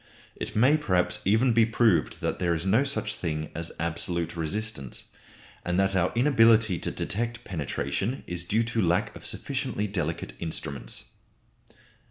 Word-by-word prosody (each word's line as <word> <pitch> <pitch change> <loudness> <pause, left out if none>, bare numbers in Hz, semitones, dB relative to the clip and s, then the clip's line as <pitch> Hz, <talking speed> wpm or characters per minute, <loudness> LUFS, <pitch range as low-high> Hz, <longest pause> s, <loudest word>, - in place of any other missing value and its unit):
It - - -6
may 130 +8 +5
perhaps 95 -12 +1
even 110 +5 +4
be 115 0 +5
proved 110 -4 +2
that - - -1
there 85 -2 +1
is 80 +3 -3
no 110 +8 +4
such 140 -7 -1
thing 75 -3 -3
as 85 +1 -5
absolute 85 +1 -2
resistance, 85 - -2 0.5
and 90 +1 0
that 95 0 +2
our 90 -1 +2
inability 115 - +5
to - - -2
detect 115 +2 -3
penetration 90 - -2
is 90 -1 -4
due 110 +6 +1
to 115 0 -1
lack 85 -2 +1
of - - -7
sufficiently 105 - -2
delicate 85 -10 -3
instruments. 80 -3 -3
95 Hz, 150 wpm, -27 LUFS, 85-115 Hz, 0.5 s, may